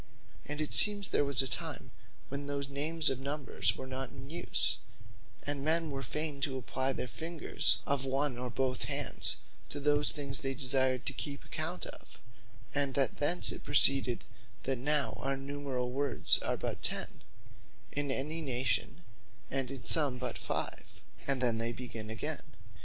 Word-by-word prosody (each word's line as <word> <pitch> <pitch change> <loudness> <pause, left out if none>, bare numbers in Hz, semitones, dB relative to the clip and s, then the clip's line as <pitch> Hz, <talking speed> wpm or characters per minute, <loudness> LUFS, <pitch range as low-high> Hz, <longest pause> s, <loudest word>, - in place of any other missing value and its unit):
And 150 +1 -5
it 155 - -1
seems, 205 -2 +4
there - - +1
was 140 -2 +5
a - - 0
time 145 -1 -3 0.4
when 140 +1 -6
those 140 -1 -4
names 155 +3 +2
of 130 - -4
number 140 +1 -6 0.2
were 130 - -7
not 130 0 -5
in 135 +3 -11
use; 170 - 0 0.7
and 145 -1 -3
men 160 0 0
were 135 -1 -5
fayn 150 +3 -3
to 135 -1 -1
apply 130 +1 -2
their 130 - -4
fingers 160 +6 +4
of 140 -2 -1
one 135 0 0
or 125 +1 -5
both 130 +1 -2
hands, - - -1 0.3
to 145 - -3
those 145 +1 +4
things 140 -2 -1
they 135 -1 -3
desired 130 -1 +2
to - - -2
keep 140 +1 -6
account - - -4
of; - - -10 0.5
and 140 -2 0
that 135 -4 +1
thence 170 +5 +2
it - - -7
proceeded, 135 -3 +7 0.4
that 130 -2 -2
now 140 -2 +1
our 135 0 -2
numerall 135 -2 -5
words 130 - +4
are - - -3
but - - -5
ten, - - -1 0.7
in 145 -1 -3
any 150 +5 -2
Nation, 125 - -2 0.5
and 135 -1 -1
in 135 -2 -8
some 145 -6 +4
but 125 0 -4
five, - - -5 0.3
and 135 -2 0
then 115 -2 +1
they 115 +1 -1
begin 115 -3 -7
again. 145 +7 -4
135 Hz, 170 wpm, -31 LUFS, 130-145 Hz, 0.7 s, proceeded